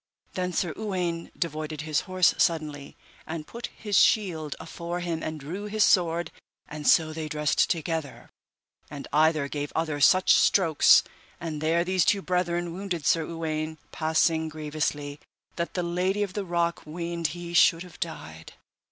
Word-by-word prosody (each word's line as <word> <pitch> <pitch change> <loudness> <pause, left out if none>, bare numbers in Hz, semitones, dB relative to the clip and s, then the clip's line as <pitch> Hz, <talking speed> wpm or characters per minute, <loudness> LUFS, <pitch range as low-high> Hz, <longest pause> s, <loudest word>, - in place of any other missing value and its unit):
Then 180 -1 -2
Sir 175 -2 -1
Uwaine 180 -6 -3
devoided 155 -2 -3
his 155 -1 0
horse 185 -1 +4
suddenly, 150 -4 -1 0.3
and 160 -1 -5
put 235 +8 -7
his 205 -4 0
shield 165 -9 +2
afore 170 +1 -5
him 170 -2 -3
and 155 0 -4
drew 175 +9 -6
his 210 0 +1
sword, 170 -2 +2 0.4
and 150 0 -6
so 160 -2 +4
they 155 -1 -5
dressed 150 -1 +1
together, 160 -4 -3 0.6
and 140 -1 -8
either 155 -1 +3
gave 145 0 -4
other 155 -3 -1
such 185 +5 +6
strokes, 165 -6 +5 0.4
and 160 -3 -5
there 165 +2 +2
these 185 0 +2
two 200 -3 +2
brethren 175 -1 -1
wounded 180 -4 -4
Sir 165 -1 +3
Uwaine 160 -1 -3
passing 160 0 +1
grievously 150 -1 -3 0.4
that 170 0 -4
the 180 - 0
Lady 180 +4 0
of 195 -2 -5
the 205 -1 -3
Rock 170 -1 0
weened 170 +1 -3
he 170 0 -7
should 170 0 +5
have 180 -3 -14
died. 80 - -7
165 Hz, 155 wpm, -26 LUFS, 155-180 Hz, 0.6 s, such